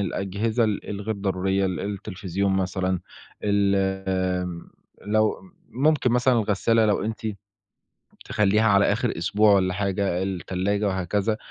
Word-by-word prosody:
الأجهزة 100 +4 -1
ال 105 -2 -2
الغير 105 +2 -3
ضرورية، 95 0 0
ال 95 -1 -3
التلفزيون 100 -1 -3
مثلًا، 95 -1 -1 0.4
الم 95 -3 0 0.4
لو 110 0 +2
ام 190 - -18 0.2
ممكن 140 -1 +2
مثلًا 125 +1 +3
الغسّالة 110 +2 +2
لو 105 -2 +1
أنتِ 110 +1 -4 1.0
تخلّيها 105 +1 +2
على 100 -2 +4
آخِر 110 +2 0
أسبوع 105 +5 +3
ولا 95 -2 +2
حاجة، 95 -2 -1
التلاجة 95 +2 -1
وهكذا. 95 +3 -1
100 Hz, 120 wpm, -24 LUFS, 95-105 Hz, 1.0 s, على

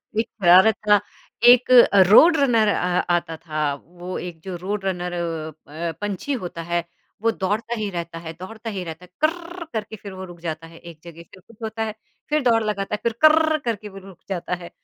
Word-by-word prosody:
एक 220 - 0
शरारत 185 +4 +7
था। 205 0 +6 0.4
एक 245 +1 +7 0.4
रोड़ 320 - +7
रनर 235 -6 +3
अ, 180 -3 +1
आता 165 -2 -1
था, 155 -3 -2
वो 175 +5 -8
एक 175 -2 -7
जो 190 -2 -5
रोड़ 200 +4 -3
रनर 180 -2 -2
अ 165 -2 -3 0.4
अ, - - -2
पँछी 205 +7 -3
होता 170 -1 -6
है, 170 0 +1 0.4
वो 230 0 +2
दौड़ता 215 +4 -2
ही 210 - -2
रहता 170 -2 -5
है, 165 -1 -8
दौड़ता 220 +6 -8
ही 195 -4 -4
रहता 165 +1 -8
है, 180 - -23
करररर 340 +2 -2
करके 220 0 -4
फिर 200 -1 -10
वो 190 0 -7
रुक 175 - -14
जाता 165 -1 -5
है, 165 - -15
एक 170 -2 -12
जगह 170 -1 -11
से 170 - -18
फिर 185 - -14
कुछ 230 -2 -18
होता 220 0 -3
है, 220 -1 -3 0.4
फिर 305 0 +2
दौड़ 230 -2 +3
लगाता 210 -1 -2
है - - -8
फिर 235 - +1
करररर 315 0 +5
करके 215 -2 -3
वो 195 - -12
रुक 190 - -14
जाता 180 -1 -2
है। 170 - -9
190 Hz, 215 wpm, -22 LUFS, 170-225 Hz, 0.4 s, शरारत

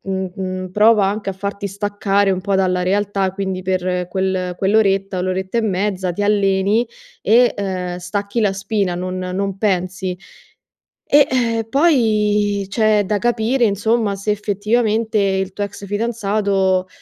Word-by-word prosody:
mhmm, 190 -1 -3
mhmm, 185 -1 -4
prova 210 -1 +4
anche 205 0 -2
a - - -4
farti 200 +1 -4
staccare 200 0 0
un 185 - -2
po' 195 +1 0
dalla 185 -1 +1
realtà, 195 0 0
quindi 190 -1 -4
per 180 -1 -1
quel 185 -1 -2
quell'oretta, 195 -2 +2
o - - -1
l'oretta 190 +4 -2
e - - +3
mezza 190 -3 -1
ti 205 +4 -2
alleni 200 +2 +2 0.4
e, 240 +3 +4
uhm, 185 -3 -3
stacchi 200 +5 -3
la 205 -3 +2
spina, 195 -2 -1
non 185 +1 -4
non 190 +1 -3
pensi. 185 -2 -1 0.9
E, 290 0 +5
ehm, 230 -3 0
poi 210 -8 +2
c'è 215 -1 +2
da 205 +1 0
capire, 240 +2 +1
insomma, 215 0 +1
se 200 +2 -3
effettivamente 215 +2 0
il 190 -1 0
tuo 205 - -5
ex 200 0 -8
fidanzato, 200 -3 0
200 Hz, 150 wpm, -19 LUFS, 190-215 Hz, 0.9 s, E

